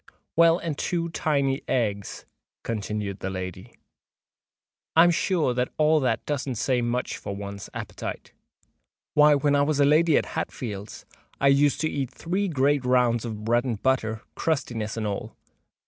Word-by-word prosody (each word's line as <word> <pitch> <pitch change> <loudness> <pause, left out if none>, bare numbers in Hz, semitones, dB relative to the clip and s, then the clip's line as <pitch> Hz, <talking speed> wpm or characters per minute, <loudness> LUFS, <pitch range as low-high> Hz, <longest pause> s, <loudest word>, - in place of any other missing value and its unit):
"Well—and 165 -2 +3
two 170 -1 -1
tiny 140 -4 0
eggs," 105 -5 -2 0.4
continued 105 -3 -3
the 95 - -3
lady;—"I 95 - -4
am 175 - +5
sure 165 -6 +1 0.2
all 155 0 +4
that 130 -3 0
doesn't 140 -3 -2
say 125 +2 +1
much 120 +1 -2
for 100 - -6
one's 100 0 -7
appetite. - - -6 0.8
Why, 150 0 +6
when 145 0 +2
I 140 - +4
was 145 0 +1
at 140 - +6
Lady 155 +2 +4
Hatfield's, 105 -5 -5 0.3
I 140 - +4
used 140 +1 +3
to 155 - +2
eat 140 -5 -2
three 185 +8 -2
great 145 -3 +2
rounds 125 -2 +2
of 110 -2 -5
bread 120 +1 +2
and 120 -6 -3
butter, 110 -4 0
crustinesses 115 -9 -2
and 110 - -2
all." 100 -1 -4
130 Hz, 145 wpm, -25 LUFS, 110-150 Hz, 0.8 s, Why